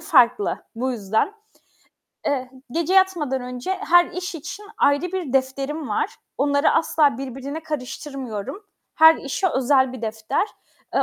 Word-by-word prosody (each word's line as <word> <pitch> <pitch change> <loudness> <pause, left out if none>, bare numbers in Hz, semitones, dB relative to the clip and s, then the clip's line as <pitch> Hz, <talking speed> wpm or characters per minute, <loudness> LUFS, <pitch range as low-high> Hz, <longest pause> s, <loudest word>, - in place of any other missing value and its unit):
farklı. 305 - +3 0.2
Bu 255 +3 -1
yüzden. 220 - 0 0.9
Eee, 260 -3 -1 0.2
gece 335 +6 0
yatmadan 340 -9 +3
önce 250 +6 -5
her 350 -3 +5
iş 360 +2 -5
için 375 +6 -7
ayrı 285 +1 +4
bir 360 -9 -3
defterim 270 +2 -1
var. 210 - 0 0.3
Onları 285 +1 +3
asla 300 -5 +3
birbirine 270 +4 -5
karıştırmıyorum. 275 - -5 0.3
Her 320 0 +8
işe 280 +7 -1
özel 260 -2 +3
bir 255 -3 -8
defter. 220 - -1 0.5
Eee, - - +4
280 Hz, 130 wpm, -23 LUFS, 255-325 Hz, 0.9 s, Her